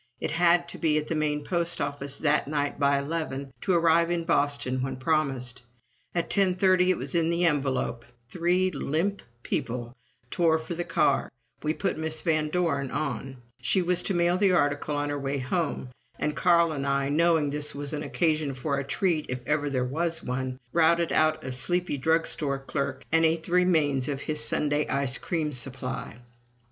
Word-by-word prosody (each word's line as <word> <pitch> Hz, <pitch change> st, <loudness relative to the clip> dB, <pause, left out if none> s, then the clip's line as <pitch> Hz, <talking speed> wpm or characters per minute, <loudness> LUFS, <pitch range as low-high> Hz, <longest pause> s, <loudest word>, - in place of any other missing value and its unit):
It -, -, -3 dB
had 170 Hz, +1 st, +3 dB
to -, -, -8 dB
be 155 Hz, -3 st, +2 dB
at 150 Hz, 0 st, -2 dB
the -, -, 0 dB
main 150 Hz, -1 st, -1 dB
post 170 Hz, +1 st, -1 dB
office 140 Hz, -1 st, -2 dB
that 150 Hz, -2 st, +1 dB
night 145 Hz, -1 st, -2 dB
by 140 Hz, 0 st, +3 dB
eleven, 140 Hz, -2 st, -4 dB
to 190 Hz, -, +1 dB
arrive 170 Hz, 0 st, +4 dB
in 175 Hz, -1 st, -1 dB
Boston 145 Hz, -5 st, 0 dB
when 130 Hz, 0 st, -3 dB
promised. 130 Hz, -4 st, -1 dB, 0.5 s
At 170 Hz, -1 st, 0 dB
ten 195 Hz, -3 st, +2 dB
thirty 185 Hz, -1 st, +3 dB
it 185 Hz, -, +2 dB
was -, -, -4 dB
in 165 Hz, -1 st, +2 dB
the 170 Hz, +1 st, +1 dB
envelope, 135 Hz, -6 st, 0 dB, 0.2 s
three 180 Hz, +6 st, +1 dB
limp 165 Hz, +7 st, -1 dB, 0.2 s
people 120 Hz, +1 st, -3 dB, 0.4 s
tore 165 Hz, -2 st, +3 dB
for 160 Hz, +2 st, -6 dB
the 175 Hz, +1 st, -3 dB
car, 140 Hz, -5 st, +1 dB, 0.3 s
we 155 Hz, +1 st, -1 dB
put 180 Hz, 0 st, -2 dB
Miss 160 Hz, 0 st, -1 dB
Van 155 Hz, -2 st, +1 dB
Doren 150 Hz, -6 st, 0 dB
on, 135 Hz, -3 st, -4 dB, 0.2 s
she 190 Hz, -, +2 dB
was 180 Hz, 0 st, +2 dB
to 195 Hz, -, -1 dB
mail 175 Hz, +1 st, +2 dB
the 195 Hz, -2 st, +4 dB
article 145 Hz, -2 st, +1 dB
on 145 Hz, 0 st, -1 dB
her 145 Hz, 0 st, -2 dB
way 140 Hz, 0 st, -2 dB
home, 140 Hz, -1 st, -2 dB, 0.3 s
and 150 Hz, -, -1 dB
Carl 170 Hz, -1 st, +4 dB
and 140 Hz, -2 st, -3 dB
I, 140 Hz, 0 st, +1 dB
knowing 160 Hz, -1 st, +2 dB
this 150 Hz, 0 st, 0 dB
was 145 Hz, 0 st, -4 dB
an 150 Hz, -, -2 dB
occasion 155 Hz, -4 st, 0 dB
for 140 Hz, +1 st, -2 dB
a -, -, -2 dB
treat 155 Hz, +3 st, 0 dB
if 125 Hz, 0 st, -3 dB
ever 145 Hz, 0 st, 0 dB
there 130 Hz, -2 st, 0 dB
was 165 Hz, +5 st, -1 dB
one, 130 Hz, 0 st, -3 dB
routed 170 Hz, 0 st, +3 dB
out 155 Hz, 0 st, +2 dB
a 130 Hz, -, -4 dB
sleepy 175 Hz, +5 st, 0 dB
drug 160 Hz, +4 st, +2 dB
store 140 Hz, -3 st, 0 dB
clerk 135 Hz, 0 st, -4 dB
and 165 Hz, 0 st, +4 dB
ate 160 Hz, 0 st, +2 dB
the 170 Hz, -, -9 dB
remains 155 Hz, -7 st, +2 dB
of 140 Hz, -1 st, -3 dB
his 150 Hz, 0 st, -1 dB
Sunday 150 Hz, 0 st, 0 dB
ice 140 Hz, -2 st, +2 dB
cream 155 Hz, -4 st, -2 dB
supply. 125 Hz, -1 st, -4 dB
150 Hz, 190 wpm, -27 LUFS, 140-170 Hz, 0.5 s, arrive